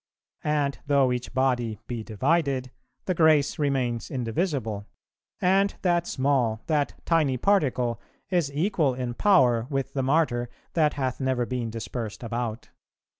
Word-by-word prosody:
And 145 -2 0
though 140 -3 +3
each 125 0 -3
body 125 -4 0
be 120 -2 -4
divided, 130 +3 0 0.3
the 185 - +1
grace 155 -4 +3
remains 130 -5 0
indivisible; 120 - -2 0.5
and 195 +2 +3
that 175 -2 +2
small, 130 -5 +1
that 150 -3 0
tiny 155 -6 +2
particle 130 - +1 0.3
is 170 -6 +1
equal 155 -3 +1
in 125 -1 -3
power 125 - +4
with 135 -2 -2
the 135 - 0
Martyr 130 -4 +1 0.2
that 155 -3 +2
hath 130 -3 -2
never 130 -2 0
been 120 -2 -3
dispersed 115 0 -5
about. 115 0 -4
130 Hz, 130 wpm, -26 LUFS, 120-150 Hz, 0.5 s, power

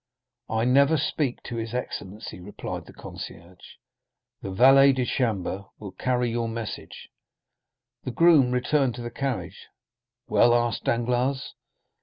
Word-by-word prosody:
"I 110 +1 0
never 140 +5 +4
speak 145 -2 -2
to 120 - -6
his 115 +1 -4
excellency," 105 -5 -6
replied 95 +3 -7
the - - -11
concierge; 90 +2 -10 0.7
"the 100 - -5
valet 135 +7 +6
de 130 -1 -1
chambre 100 -6 -1
will 100 -3 -8
carry 125 +4 -1
your 115 0 -1
message." 115 -1 -7 0.9
The - - -4
groom 155 -1 +5
returned 125 0 +1
to 120 - -7
the 120 - -5
carriage. 135 0 -4 0.6
"Well?" 120 0 +4
asked 120 -2 0
Danglars. 125 +3 0
120 Hz, 130 wpm, -25 LUFS, 115-130 Hz, 0.9 s, valet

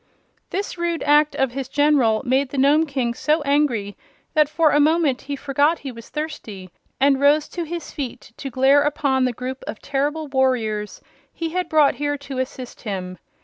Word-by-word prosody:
This 390 -2 -4
rude 340 -1 -1
act 295 +1 +4
of 265 -2 +1
his 270 0 -4
General 275 -7 +3
made 260 +2 +1
the 280 - -6
Nome 290 +4 +4
King 260 -4 -1
so 305 +5 0
angry 280 -8 +1 0.4
that 305 -2 +3
for 310 0 +3
a 295 - +3
moment 305 -3 +2
he 280 +1 -5
forgot 285 +4 +1
he 270 - -3
was 230 -1 -12
thirsty 230 - -6 0.3
and 275 0 +4
rose 295 +2 +4
to 345 -1 -4
his 340 +1 -6
feet 255 -4 -6
to 270 - -5
glare 270 +3 +4
upon 275 -3 +1
the 250 - +1
group 255 +2 -6
of 220 - -6
terrible 290 +3 -2
warriors 245 -6 0 0.3
he 330 -1 -4
had 360 0 -2
brought 305 -3 +4
here 290 0 -2
to 275 -2 -6
assist 260 -1 -6
him. 185 -4 -5
280 Hz, 185 wpm, -22 LUFS, 255-300 Hz, 0.4 s, act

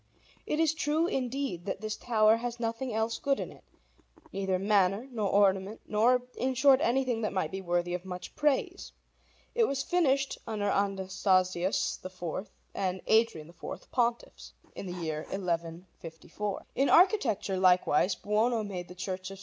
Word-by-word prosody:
It 300 - -1
is 320 -1 +3
true, 320 +1 +1
indeed, 260 - -2
that 195 - -3
this 215 -1 -3
tower 220 -2 +3
has 240 0 -5
nothing 230 +2 -2
else 220 +1 -1
good 275 -1 0
in - - -5
it, - - -17 0.7
neither 190 -1 0
manner, 200 +3 +2
nor 215 -5 -1
ornament, 195 +1 +2
nor, 245 +4 +3
in 260 +1 -1
short, 270 +1 +5
anything 250 -3 +1
that 215 - -1
might 185 -5 -1
be 190 0 -4
worthy 175 -1 -1
of 180 0 -3
much 180 -1 -8
praise. 305 +5 0 0.6
It 465 -1 +3
was 275 -5 -1
finished 275 -6 +1
under 210 -2 -1
Anastasius 190 -2 +1
IV 185 +1 -5 0.2
and 185 -1 -2
Adrian 220 -9 +2
IV, 170 - -9
Pontiffs, 240 -1 -2 0.2
in 195 - -7
the 180 - -5
year 155 -1 -2
1154. 170 +1 -5
In 275 +2 +2
architecture, 265 - +3
likewise, 180 -1 +3
Buono 220 +2 +1
made 185 -4 -5
the 180 - -11
Church 185 0 -4
of 195 - -9
S. - - -15
210 Hz, 160 wpm, -30 LUFS, 185-250 Hz, 0.7 s, short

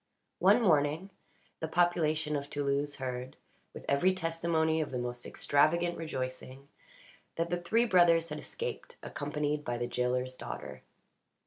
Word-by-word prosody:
One 240 - +5
morning, 160 +1 +2 0.5
the 160 - -2
population 160 -3 +2
of 140 0 -3
Toulouse 145 0 -1
heard, 125 -1 -5 0.3
with - - -10
every 180 +7 +3
testimony 165 -2 +1
of 150 - -2
the 130 - -3
most 120 0 -4
extravagant 170 +4 +2
rejoicing, 130 -2 -5 0.7
that 165 +1 -1
the 175 0 -1
three 225 +7 +2
brothers 170 -5 +4
had 150 0 -4
escaped, - - -6
accompanied 150 +1 -2
by 120 -3 -2
the 120 - -1
jailer's 125 +1 -1
daughter. - - -7
150 Hz, 135 wpm, -31 LUFS, 135-170 Hz, 0.7 s, One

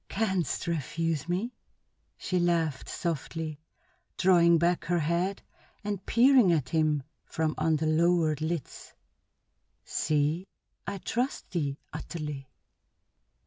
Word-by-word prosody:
"Canst 190 -5 -1
refuse 165 0 -2
me?" 205 +8 -1 0.6
she 185 - -1
laughed 165 -5 0
softly, 160 -1 -3 0.6
drawing 170 -2 +5
back 170 +2 +1
her 175 0 +1
head 170 +5 0 0.4
and 205 -2 -3
peering 245 -4 +6
at 155 -6 +1
him 155 -3 +1 0.2
from 160 -1 -1
under 155 0 +1
lowered 160 -1 +2
lids. 160 -2 -4 0.9
"See, 155 +4 0 0.4
I 200 - -3
trust 245 +7 -2
thee 145 -6 -1 0.2
utterly!" 150 -5 -6
170 Hz, 105 wpm, -29 LUFS, 155-180 Hz, 0.9 s, peering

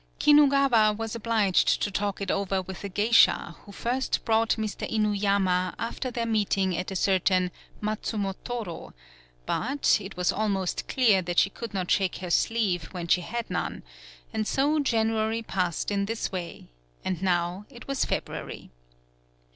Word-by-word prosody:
Kinugawa 275 -7 +5
was 225 -1 -4
obliged 220 -4 +2
to 205 - -1
talk 200 +1 -2
it 195 - -1
over 195 -1 0
with 185 +1 -7
a 200 - -4
geisha 205 -4 +3
who 205 - -13
first 245 +6 -2
brought 225 0 +2
Mr. 215 -2 -4
Inuyama 200 -4 +1
after 235 +3 -3
their 235 -1 -2
meeting 200 -4 +1
at 180 - -3
a 190 - -5
certain 185 -1 +2 0.3
Matsumotoro, 210 -2 -4 0.5
but, 270 - +1
it 195 -2 -9
was 180 -1 +2
almost 195 -3 -1
clear 220 -7 +3
that 175 -1 -4
she 195 - +4
could 230 -1 -7
not 185 -2 -2
shake 190 -2 +2
her 180 -2 -6
sleeve 195 -5 +1
when 175 0 -6
she 180 - +3
had 235 +6 -4
none, - - -3 0.5
and 215 -1 -1
so 290 +3 +2
January 225 -3 0
passed 180 -4 -2
in 200 -1 0
this 225 +2 -3
way, 180 -3 -6 0.4
and 185 -2 -2
now 180 +1 0
it 245 -3 -13
was 275 -1 0
Feb - - 0
ruary. - - -8
205 Hz, 155 wpm, -27 LUFS, 185-230 Hz, 0.5 s, Kinugawa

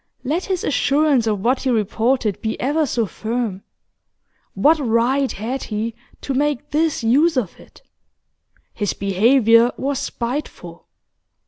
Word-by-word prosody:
Let 310 +8 -1
his 375 -2 -2
assurance 280 -4 +2
of 210 -3 -1
what 250 +5 +1
he 265 - -1
reported 225 0 0
be 220 0 -3
ever 295 +4 0
so 235 -3 0
firm, 220 -1 -4 0.9
what 315 +2 +4
right 255 +2 +1
had 240 +6 -4
he 220 +1 -3 0.3
to 275 - -3
make 290 -1 -1
this 310 -4 0
use 290 +7 +3
of 215 -9 -2
it? - - -18 0.9
His 205 -3 -2
behaviour 230 +4 +4
was 275 0 -2
spiteful. 255 +3 -5
250 Hz, 130 wpm, -20 LUFS, 225-285 Hz, 0.9 s, what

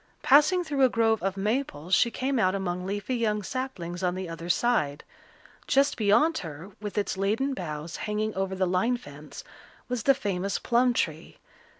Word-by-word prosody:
Passing 300 +6 +5
through 290 -4 -2
a 260 - +6
grove 225 -2 +2
of 195 +1 -2
maples 195 - -2
she 235 - +5
came 265 +2 -1
out 185 -2 +2
among 180 -1 -3
leafy 205 +5 -3
young 210 -3 0
saplings 190 -9 -5
on 180 -1 0
the 185 -1 -4
other 165 +1 -7
side. 175 -8 +1 0.6
Just 280 +1 +3
beyond 250 +10 +3
her, 165 +3 -8
with 210 -1 -6
its 200 -2 -1
laden 220 +8 0
boughs 160 - -5
hanging 215 0 -2
over 190 0 -2
the 185 0 +1
line 185 +7 +1
fence, 145 -6 -11 0.4
was 250 -2 -2
the 275 +4 +4
famous 195 -4 -2
plum 245 +1 +2
tree. - - -2
205 Hz, 175 wpm, -27 LUFS, 180-250 Hz, 0.6 s, a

